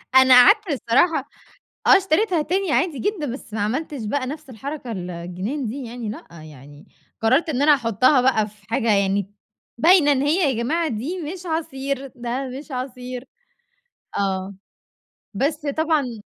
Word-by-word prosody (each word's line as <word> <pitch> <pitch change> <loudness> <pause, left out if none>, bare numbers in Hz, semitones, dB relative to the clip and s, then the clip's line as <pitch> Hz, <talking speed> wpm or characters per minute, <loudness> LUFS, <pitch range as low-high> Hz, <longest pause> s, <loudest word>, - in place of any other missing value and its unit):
أنا 260 0 +7
قعدت 420 -2 +5
الصراحة 280 +5 +1 0.6
آه 395 - +8
اشتريتها 375 -2 +1
تاني 365 +2 -1
عادي 320 -6 +1
جدًا 400 -7 -2
بس 230 -5 -10
ما 220 - -2
عملتش 260 +2 -3
بقى 255 +3 -2
نفس 300 0 -7
الحركة 265 +1 -6
ال 180 -3 -5
الجنان 185 - -4
دي 255 +5 -5
يعني 230 -2 -6
لأ 215 - -8 0.2
يعني 145 -1 -14 0.3
قررت 260 +9 +2
إن 275 -2 -1
أنا 295 0 +6
أحطها 255 +2 +3
بقى 230 -5 +2
في 205 -1 -19
حاجة 230 -1 +1
يعني 200 0 0 0.4
باينة 320 +1 +5
إن 270 -1 +2
هي 300 +1 +2
يا 235 -2 -1
جماعة 330 +6 0
دي 295 +10 -4
مش 365 -1 -10
عصير، 275 -4 -3
ده 245 +2 -4
مش 300 0 -13
عصير. 250 0 -6 0.9
آه، 190 0 -2 0.8
بس 295 +7 -1
طبعًا 285 -7 0
265 Hz, 155 wpm, -22 LUFS, 225-310 Hz, 0.9 s, آه